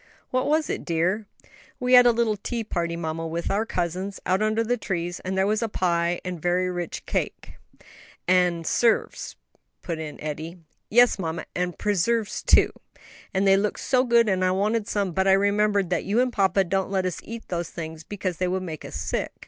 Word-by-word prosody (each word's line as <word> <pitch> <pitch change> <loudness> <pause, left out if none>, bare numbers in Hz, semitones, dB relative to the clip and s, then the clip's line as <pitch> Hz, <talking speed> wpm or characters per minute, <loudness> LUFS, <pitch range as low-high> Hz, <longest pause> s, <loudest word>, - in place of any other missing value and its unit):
"What 255 0 +1
was 310 +1 +2
it, - - -3
dear?" 180 +5 0 0.5
"We 250 -1 +1
had 245 -1 +9
a - - +7
little 230 -2 +1
tea 230 +3 -4
party, 170 -5 -2
mamma, 165 0 -3
with 165 +1 -3
our 210 +3 0
cousins, 185 +2 -3
out 185 +2 +1
under 215 +1 +1
the 240 +2 +1
trees, 175 -5 -3
and 190 +1 -4
there 190 - +3
was 215 +2 +1
pie 170 -1 +1
and 180 -3 -5
very 180 +1 +1
rich 175 -2 -5
cake - - -3 0.3
" - - -20 0.3
"And 180 -2 +3
'serves," 230 +5 +1 0.5
put 165 -2 -4
in 155 -2 -6
Eddie. 155 +3 -5 0.3
"Yes, 245 -1 +5
mamma, 165 -2 -3
and 180 0 -2
preserves 210 +2 0
too, - - +5 0.6
and 195 0 +1
they 195 0 +6
looked 205 +1 -1
so 255 -1 +2
good, 235 -2 +4
and 190 -2 +1
I 185 - +3
wanted 205 +4 0
some, 200 -3 -1
but 190 +3 +1
I 190 - +6
remembered 200 -1 +2
that 175 - +1
you 210 +4 +1
and 250 -1 +1
papa 195 -1 +3
don't 190 +2 -1
let 190 -1 0
us 185 - -2
eat 230 0 -8
those 175 -2 -2
things 160 -1 -7
because 185 -2 -4
they 185 - 0
would 185 +1 -1
make 160 -4 -6
us - - -8
sick. - - -2
190 Hz, 200 wpm, -25 LUFS, 175-215 Hz, 0.6 s, had